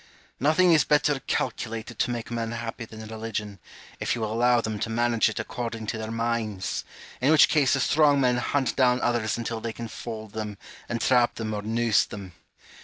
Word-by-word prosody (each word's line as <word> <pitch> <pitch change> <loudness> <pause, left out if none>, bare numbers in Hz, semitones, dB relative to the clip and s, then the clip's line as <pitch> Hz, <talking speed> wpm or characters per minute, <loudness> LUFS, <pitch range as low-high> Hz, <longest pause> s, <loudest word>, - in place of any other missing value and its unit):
Nothing 165 +6 +4
is 155 - +5
better 150 -1 +2
calculated 115 -2 -3
to - - +1
make 120 -1 -4
men 115 -1 -2
happy 115 0 -5
than 110 0 -10
religion, 110 -2 -5 0.4
if - - 0
you 120 - -5
will 110 -1 -2
allow 120 +1 +4
them 110 -2 -3
to 115 - -2
manage 115 0 +2
it 110 - -5
according 115 -2 -4
to 110 +1 -3
their 110 0 -4
minds; 115 -5 -2 0.4
in 135 - +3
which 155 0 +7
case 145 -4 +3
the 140 - +2
strong 145 +1 +4
men 125 -2 +3
hunt 130 +1 0
down 125 -2 +3
others 115 -3 0
until 115 -1 -4
they 115 - -3
can 115 0 -6
fold 110 -2 -7
them, 105 -2 -5 0.3
entrap 120 +1 +2
them, 110 -1 -3
or 105 - -3
noose 115 +1 +2
them. 95 -4 -9
115 Hz, 190 wpm, -26 LUFS, 110-125 Hz, 0.4 s, which